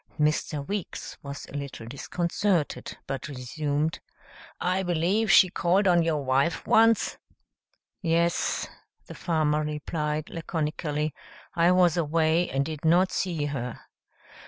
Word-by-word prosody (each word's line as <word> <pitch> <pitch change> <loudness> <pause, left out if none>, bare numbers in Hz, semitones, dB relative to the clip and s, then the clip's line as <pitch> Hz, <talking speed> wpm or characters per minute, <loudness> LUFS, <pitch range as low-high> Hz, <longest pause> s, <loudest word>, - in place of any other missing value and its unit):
Mr. 150 -1 0
Weeks 200 -3 -5
was 140 0 -7
a - - -15
little 140 -5 -6
disconcerted 170 - -1
but 135 -2 -4
resumed, 145 +3 -2 0.6
"I 185 +1 0
believe 185 +5 +1
she 185 - +8
called 185 +3 +2
on 175 -2 +5
your 160 -3 0
wife 135 +6 +1
once?" 225 0 +3 0.8
"Yes," 170 -1 +1 0.4
the - - -9
farmer 155 -3 0
replied 150 0 -3
laconically. 155 -2 -2 0.4
"I 170 0 +4
was 180 -2 +4
away 165 +1 +2
and 135 +1 0
did 155 -1 -6
not 175 +4 +4
see 170 -6 -1
her." 125 -4 -4
160 Hz, 120 wpm, -27 LUFS, 145-175 Hz, 0.8 s, she